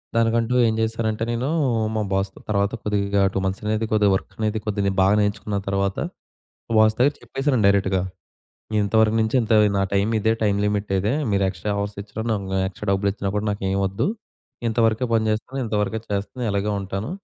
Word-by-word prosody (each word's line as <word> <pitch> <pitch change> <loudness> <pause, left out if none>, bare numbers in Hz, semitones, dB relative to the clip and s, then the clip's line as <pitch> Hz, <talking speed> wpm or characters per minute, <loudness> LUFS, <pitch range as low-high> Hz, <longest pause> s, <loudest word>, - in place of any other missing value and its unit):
దానికంటూ 115 +1 +2
ఏం 110 - +1
జేశానంటే, 110 0 -1
నేనూ 125 +4 -1 0.5
మా 110 - +1
బాస్‌తో 95 0 -2
తర్వాత 100 -1 +1
కొద్దిగా 100 -1 +1
2 95 - 0
మంత్సనేది 105 +3 -1
కొద్దిగా 105 -2 +4
వర్కనేది 110 +2 -2
కొద్దిగా 100 -2 0
బాగా 100 +2 +4
నేర్చుకున్న 105 0 -1
తర్వాత 100 0 0 0.7
మా 115 - -3
బాస్ 110 0 +5
దగ్గర 140 +4 +4
చెప్పేసానండి 135 -5 0
డైరెక్ట్‌గా. 95 -2 +2 0.8
ఇంత 100 +2 -2
వరకు 110 0 +3
నుంచి 110 +4 0
ఇంత 110 0 0 0.2
నా 100 - +2
టైం 100 +2 +2
ఇదే 110 +2 +2
టైమ్ 100 -1 +2
లిమిట్ 105 -1 -1
ఇదే, 105 +6 0 0.2
మీరు 100 -1 +2
ఎక్స్ట్రా 95 +3 -4
అవర్స్ 100 0 -3
ఇచ్చినా 110 +2 -6
నాకు 95 -2 -2
ఎక్స్ట్రా 100 +2 -8
డబ్బులిచ్చినా 100 0 0
గూడా 105 +1 -1
నాకేం 95 -1 -1
ఒద్దు. 100 - -1 0.6
ఇంతవరకే 115 +1 +2
పని 110 -1 +2
జేస్తాను. 125 +5 -3
ఇంతవరకే 105 0 -1
చేస్తాను. 100 +5 -3
ఇలాగే 100 +1 0
ఉంటాను. 95 - -4
105 Hz, 165 wpm, -23 LUFS, 100-110 Hz, 0.8 s, బాస్